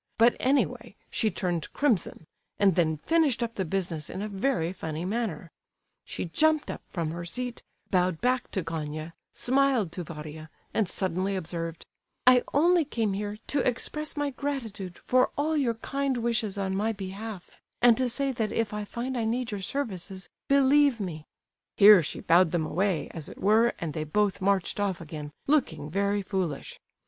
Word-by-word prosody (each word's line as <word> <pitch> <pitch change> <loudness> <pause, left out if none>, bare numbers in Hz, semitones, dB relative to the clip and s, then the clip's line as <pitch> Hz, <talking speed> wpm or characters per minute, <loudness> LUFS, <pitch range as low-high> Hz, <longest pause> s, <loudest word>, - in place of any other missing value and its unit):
But 235 +1 +5
anyway, 270 +2 0 0.2
she 220 - +1
turned 175 -4 -2
crimson, 225 - 0 0.3
and 200 -2 +4
then 160 -2 +2
finished 290 - +2
up 230 -1 -3
the 190 - -2
business 170 -4 -3
in 195 - -4
a - - -2
very 195 -4 0
funny 160 -2 -4
manner. 190 -6 -3 0.5
She - - -4
jumped 310 - +2
up - - -7
from 165 -4 -3
her 170 +1 -5
seat, 245 +7 -4 0.3
bowed 180 -3 +2
back 250 +1 +1
to 190 - -1
Gania, 155 0 -5 0.2
smiled 260 -7 +2
to 180 - -5
Varia, 155 -1 -8 0.2
and 210 -5 +1
suddenly 185 +1 -1
observed: 165 -2 -4 0.4
'I 250 0 +7
only 340 +4 +4
came 225 -8 -1
here 205 +1 -3
to 285 - 0
express 295 +5 -2
my 290 -1 0
gratitude 235 -10 -4
for 255 0 +2
all 310 +2 +1
your 255 -6 +1
kind 275 +3 -2
wishes 230 -3 0
on 190 -1 -1
my 215 +3 +1
behalf, 200 0 -7 0.2
and 240 -1 +6
to 255 -1 +1
say 275 +3 -1
that 220 -4 -2
if 230 -2 -1
I 210 0 -3
find 240 +5 -4
I 235 -2 0
need 240 +1 -1
your 205 -2 -4
services, 190 -5 -3 0.2
believe 280 -2 +4
me—' 160 -6 -5 0.5
Here 205 -2 +9
she 150 - -5
bowed 175 +1 +5
them 160 -1 0
away, 185 0 0
as 160 -3 -7
it - - -11
were, 220 +4 +4
and 165 -4 -4
they 155 -1 -3
both 200 +6 +1
marched 195 0 +1
off 200 -3 0
again, 150 -2 -7
looking 160 - +1
very 200 +2 +1
foolish. 185 -7 -3
205 Hz, 175 wpm, -28 LUFS, 175-245 Hz, 0.5 s, Here